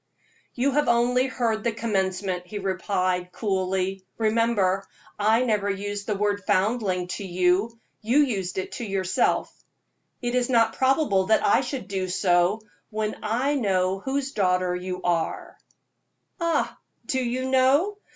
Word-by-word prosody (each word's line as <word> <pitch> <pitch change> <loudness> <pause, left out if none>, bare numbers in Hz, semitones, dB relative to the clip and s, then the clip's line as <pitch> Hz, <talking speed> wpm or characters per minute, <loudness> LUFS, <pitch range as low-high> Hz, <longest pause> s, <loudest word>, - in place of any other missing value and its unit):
"You 260 +3 +1
have 295 +2 +1
only 245 +2 +3
heard 230 -4 -1
the 235 - +1
commencement," 190 -4 -2
he 205 - -6
replied, 185 -2 -1
coolly. 190 -2 -1
"Remember, 215 -4 +1 0.4
I 220 +4 +3
never 210 -4 +1
used 200 +1 -4
the 210 - 0
word 205 0 0
'foundling' 190 -3 +1
to 200 - -4
you 185 +5 +1 0.2
you 230 +5 +1
used 205 -12 +1
it 190 - -3
to - - -5
yourself. 190 -3 0 0.7
It 240 -1 -3
is 250 0 +1
not 230 -3 +3
probable 260 -8 +2
that 220 - +3
I 205 - +4
should 255 -5 -5
do 190 -1 -2
so 180 +2 +2 0.3
when 215 -1 -2
I 245 +7 0
know 190 -7 +1
whose 275 +4 -2
daughter 180 -3 +1
you 180 0 -5
are." 170 -2 -1 0.8
"Ah! 335 -1 0 0.3
Do 260 -1 -1
you 250 +2 -2
know? 275 +10 +3
205 Hz, 140 wpm, -25 LUFS, 185-240 Hz, 0.8 s, I